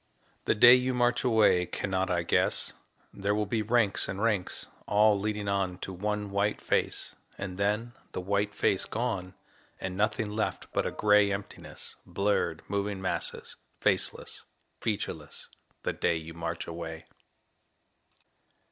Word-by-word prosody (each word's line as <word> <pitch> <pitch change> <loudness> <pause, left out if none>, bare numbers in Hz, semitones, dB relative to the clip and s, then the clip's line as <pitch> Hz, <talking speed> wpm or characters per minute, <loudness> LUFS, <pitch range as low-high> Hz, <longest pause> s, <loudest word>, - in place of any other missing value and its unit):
The - - +3
day 120 +3 +9
you 125 0 +3
march 120 0 +2
away 110 -7 +4
cannot 95 +1 -1
I 85 -1 +1
guess? - - +1 0.4
There 100 +1 0
will 105 0 +1
be 110 +2 0
ranks 110 -2 +2
and 95 - -3
ranks, 105 -4 0 0.2
all 105 0 +4
leading 105 0 -2
on 95 -2 0
To 95 - -6
one 105 +2 -2
white 100 +1 +1
face, - - -1 0.2
and 100 -1 -5
then 105 +4 0 0.2
the - - -2
white 100 +2 0
face 95 - +2
gone, 100 -6 -3 0.4
And 95 -1 -4
nothing 105 +1 0
left 110 +1 -3
but - - +1
a - - -2
gray 105 -1 +4
emptiness 100 0 -7
Blurred 100 -5 0
moving 100 0 -1
masses, 95 - -3 0.2
faceless, - - 0 0.4
featureless 105 -3 -4 0.3
The - - 0
day - - +1
you 80 0 -6
march 85 0 -4
away. 80 -1 -6
100 Hz, 140 wpm, -29 LUFS, 95-105 Hz, 0.4 s, day